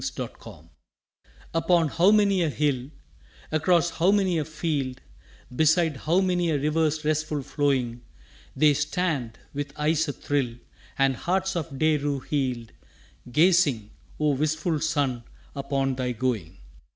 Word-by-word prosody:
SUNSET -, -, -5 dB
LOVERS -, -, -12 dB, 0.9 s
Upon 165 Hz, 0 st, +3 dB
how 170 Hz, +6 st, +4 dB
many 205 Hz, -3 st, +4 dB
a 165 Hz, -, +2 dB
hill, 140 Hz, -4 st, -1 dB, 0.6 s
Across 170 Hz, +2 st, +2 dB
how 175 Hz, +3 st, +2 dB
many 190 Hz, -4 st, +2 dB
a 150 Hz, -, -2 dB
field, 150 Hz, -5 st, -3 dB, 0.6 s
Beside 160 Hz, +1 st, +3 dB
how 165 Hz, +8 st, +1 dB
many 180 Hz, -2 st, +1 dB
a 155 Hz, -, +1 dB
river's 155 Hz, +1 st, 0 dB
restful 155 Hz, -1 st, -1 dB
flowing, 130 Hz, -5 st, -1 dB, 0.5 s
They 150 Hz, -1 st, +5 dB
stand, 145 Hz, -5 st, -2 dB, 0.2 s
with 145 Hz, 0 st, -4 dB
eyes 155 Hz, +2 st, +1 dB
a 145 Hz, -, -2 dB
thrill, 135 Hz, -5 st, -2 dB, 0.4 s
And 135 Hz, -1 st, +3 dB
hearts 190 Hz, +6 st, -1 dB
of 160 Hz, -5 st, -4 dB
day 155 Hz, +1 st, +3 dB
rue 140 Hz, -1 st, -2 dB
healed, 130 Hz, -6 st, -2 dB, 0.6 s
Gazing, 150 Hz, -, +3 dB, 0.3 s
O 150 Hz, -1 st, +2 dB
wistful 155 Hz, +3 st, 0 dB
sun, 145 Hz, -6 st, -1 dB, 0.3 s
upon 135 Hz, -1 st, -1 dB
thy 125 Hz, -1 st, -2 dB
going! 110 Hz, -8 st, -2 dB
150 Hz, 135 wpm, -25 LUFS, 135-165 Hz, 0.9 s, They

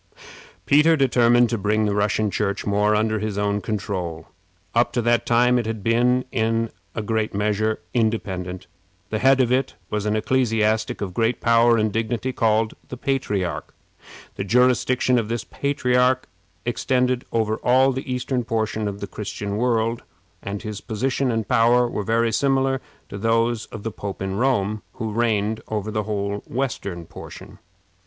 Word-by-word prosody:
Peter 155 Hz, +3 st, +5 dB
determined 120 Hz, -2 st, +4 dB
to 115 Hz, -1 st, -2 dB
bring 105 Hz, +2 st, +1 dB
the 105 Hz, -, 0 dB
Russian 105 Hz, +1 st, +1 dB
Church 100 Hz, +1 st, -1 dB
more 105 Hz, +1 st, +2 dB
under 110 Hz, 0 st, +1 dB
his 105 Hz, -1 st, -3 dB
own 105 Hz, 0 st, 0 dB
control. 90 Hz, -6 st, -4 dB, 0.5 s
Up -, -, +3 dB
to 120 Hz, -, +1 dB
that 120 Hz, 0 st, +2 dB
time 125 Hz, +1 st, +4 dB
it 115 Hz, -, -3 dB
had 110 Hz, -3 st, -4 dB
been, 125 Hz, +3 st, +2 dB
in 115 Hz, 0 st, 0 dB, 0.2 s
a 110 Hz, -, -2 dB
great 110 Hz, -1 st, -1 dB
measure, 105 Hz, +1 st, 0 dB
independent. 95 Hz, -6 st, -1 dB, 0.5 s
The -, -, -1 dB
head 135 Hz, 0 st, +4 dB
of 125 Hz, -2 st, +2 dB
it 130 Hz, +1 st, +1 dB, 0.2 s
was 105 Hz, 0 st, -1 dB
an 105 Hz, -, +1 dB
ecclesiastic 110 Hz, -2 st, +1 dB
of 95 Hz, -3 st, -3 dB
great 115 Hz, +5 st, +1 dB
power 115 Hz, 0 st, +4 dB
and 110 Hz, -1 st, 0 dB
dignity, 115 Hz, +3 st, -1 dB
called 110 Hz, -1 st, +1 dB, 0.2 s
the 125 Hz, -, -6 dB
Patriarch. 105 Hz, -10 st, -2 dB, 0.6 s
The -, -, -2 dB
jurisdiction 125 Hz, +3 st, +3 dB
of 110 Hz, -, -3 dB
this 115 Hz, 0 st, -2 dB
patriarch 130 Hz, -2 st, +1 dB, 0.4 s
extended 125 Hz, -1 st, 0 dB
over 110 Hz, -1 st, 0 dB
all 130 Hz, +3 st, +4 dB
the 130 Hz, 0 st, -5 dB
eastern 125 Hz, 0 st, -1 dB
portion 110 Hz, -1 st, -1 dB
of 100 Hz, 0 st, -5 dB
the 100 Hz, -, -4 dB
Christian 100 Hz, -1 st, -5 dB
world, 115 Hz, 0 st, 0 dB, 0.4 s
and 100 Hz, 0 st, -5 dB
his 105 Hz, -1 st, -5 dB
position 125 Hz, +3 st, -1 dB
and 115 Hz, -3 st, -2 dB
power 120 Hz, +2 st, +4 dB
were 110 Hz, -, -3 dB
very 115 Hz, +2 st, +1 dB
similar 135 Hz, +1 st, +1 dB, 0.3 s
to 100 Hz, -, -6 dB
those 115 Hz, +1 st, +1 dB
of 105 Hz, -, -9 dB
the 115 Hz, -, -3 dB
Pope 100 Hz, -1 st, -6 dB
of 95 Hz, -, -2 dB
Rome, 105 Hz, -2 st, 0 dB
who 110 Hz, -1 st, -4 dB
reigned 110 Hz, -1 st, 0 dB
over 110 Hz, 0 st, -3 dB
the 105 Hz, -1 st, -2 dB
whole 100 Hz, -1 st, -2 dB
western 100 Hz, -9 st, -3 dB
portion. -, -, -11 dB
110 Hz, 160 wpm, -23 LUFS, 105-125 Hz, 0.6 s, Peter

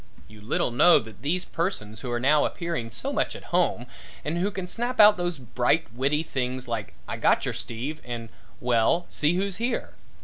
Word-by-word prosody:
You 105 Hz, 0 st, -14 dB
little 110 Hz, +3 st, 0 dB
know 170 Hz, +9 st, +7 dB
that 110 Hz, -2 st, -6 dB
these 175 Hz, +6 st, -1 dB
persons 110 Hz, -, -3 dB
who 125 Hz, -1 st, -5 dB
are 120 Hz, -, 0 dB
now 145 Hz, +4 st, +4 dB
appearing 170 Hz, -10 st, -2 dB
so 115 Hz, -, -4 dB
much -, -, 0 dB
at -, -, -9 dB
home -, -, +2 dB, 0.4 s
and 165 Hz, +3 st, -1 dB
who 195 Hz, +3 st, +1 dB
can 190 Hz, -3 st, -5 dB
snap 240 Hz, +6 st, -3 dB
out 210 Hz, 0 st, +9 dB
those 175 Hz, -2 st, -2 dB
bright, 125 Hz, +1 st, 0 dB
witty 140 Hz, +5 st, +1 dB
things 130 Hz, -3 st, -3 dB
like 110 Hz, -5 st, -4 dB
"I -, -, -4 dB
gotcher -, -, +2 dB
Steve," 135 Hz, +7 st, -5 dB
and 120 Hz, -2 st, -6 dB, 0.3 s
"Well, 125 Hz, +8 st, +2 dB
see 155 Hz, +3 st, +2 dB
who's 195 Hz, 0 st, -1 dB
here?" 235 Hz, +3 st, -2 dB
140 Hz, 190 wpm, -26 LUFS, 120-175 Hz, 0.4 s, out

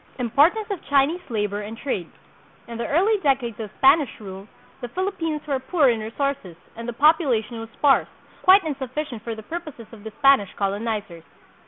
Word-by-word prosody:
Importance 290 Hz, -, +3 dB
of 390 Hz, -, -4 dB
Chinese 285 Hz, +5 st, +3 dB
Labor 210 Hz, -2 st, -2 dB
and 215 Hz, +2 st, -7 dB
Trade. 195 Hz, -, -3 dB, 0.6 s
In 235 Hz, -1 st, -7 dB
the -, -, -2 dB
early 400 Hz, +8 st, +2 dB
decades 260 Hz, -, 0 dB
of 215 Hz, -2 st, -5 dB
Spanish 275 Hz, 0 st, +5 dB
rule, 195 Hz, -1 st, -9 dB, 0.3 s
the 245 Hz, -, -4 dB
Philippines 325 Hz, -1 st, -3 dB
were 280 Hz, -3 st, -1 dB
poor 275 Hz, +1 st, +2 dB
in 230 Hz, -2 st, +1 dB
resources 225 Hz, -, -3 dB, 0.2 s
and 230 Hz, +1 st, -7 dB
the -, -, -4 dB
population 250 Hz, -6 st, +2 dB
was 225 Hz, 0 st, -8 dB
sparse, 280 Hz, -2 st, +4 dB, 0.3 s
quite 380 Hz, +1 st, +6 dB
insufficient 275 Hz, -4 st, -4 dB
for 230 Hz, 0 st, -5 dB
the 220 Hz, -, -10 dB
purposes 305 Hz, -4 st, -7 dB
of 220 Hz, -3 st, -13 dB
the 220 Hz, -, -6 dB
Spanish 275 Hz, -9 st, +4 dB
colonizers. 200 Hz, -3 st, -3 dB
255 Hz, 170 wpm, -23 LUFS, 220-300 Hz, 0.6 s, quite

